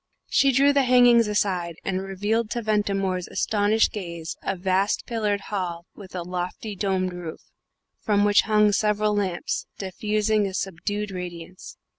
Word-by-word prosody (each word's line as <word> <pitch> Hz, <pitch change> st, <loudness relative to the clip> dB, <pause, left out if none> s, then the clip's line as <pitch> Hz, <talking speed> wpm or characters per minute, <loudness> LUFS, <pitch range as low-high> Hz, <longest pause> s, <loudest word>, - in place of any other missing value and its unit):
She 275 Hz, -, +4 dB
drew 275 Hz, +2 st, +4 dB
the 280 Hz, -, +4 dB
hangings 245 Hz, -3 st, +5 dB
aside, 185 Hz, -5 st, -1 dB
and 190 Hz, -1 st, -1 dB
revealed 205 Hz, +4 st, -1 dB
to 235 Hz, 0 st, -3 dB
Ventimore's 195 Hz, -4 st, 0 dB
astonished 215 Hz, +1 st, +1 dB
gaze 170 Hz, -5 st, -6 dB
a 195 Hz, -, -2 dB
vast 190 Hz, +2 st, 0 dB
pillared 210 Hz, -4 st, -1 dB
hall 175 Hz, -3 st, -3 dB
with 190 Hz, -3 st, -12 dB
a 180 Hz, -, -3 dB
lofty 180 Hz, +4 st, -5 dB
domed 185 Hz, -2 st, -1 dB
roof, 175 Hz, -3 st, -7 dB, 0.6 s
from 205 Hz, -1 st, +2 dB
which 205 Hz, 0 st, +5 dB
hung 210 Hz, -1 st, +4 dB
several 210 Hz, 0 st, +1 dB
lamps, 190 Hz, -4 st, -2 dB
diffusing 210 Hz, +2 st, 0 dB
a 190 Hz, -, -6 dB
subdued 200 Hz, +3 st, -3 dB
radiance. 180 Hz, -1 st, -8 dB
200 Hz, 145 wpm, -24 LUFS, 185-215 Hz, 0.6 s, hangings